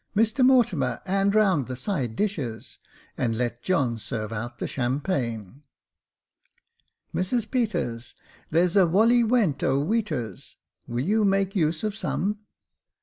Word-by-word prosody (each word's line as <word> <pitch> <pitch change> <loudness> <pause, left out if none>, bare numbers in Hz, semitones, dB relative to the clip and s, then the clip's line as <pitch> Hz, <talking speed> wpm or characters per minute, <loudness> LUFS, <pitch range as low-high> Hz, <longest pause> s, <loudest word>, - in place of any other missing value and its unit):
Mr 225 +5 +2
Mortimer, 195 - +3
'and 195 +2 +1
round 190 - +3
the 130 - -4
side 130 - -2
dishes, 140 - -3 0.4
and 115 -3 0
let 120 0 -2
John 130 -11 0
serve 110 0 -4
out 120 +2 -5
the - - -3
champagne." 125 - -2 0.7
" - - -43
Mrs 220 +5 -1
Peters, 175 - -2 0.3
there's 170 +3 +2
a 190 -3 +6
wolley 225 +8 +4
nuent 225 - +2
0' 135 +2 +1
iveaters. 155 - -3 0.3
Will 120 +3 -2
you 215 +4 +2
make 195 0 +1
use 160 -1 0
of 215 -1 -1
some 210 -1 -2
170 Hz, 135 wpm, -25 LUFS, -, 0.7 s, a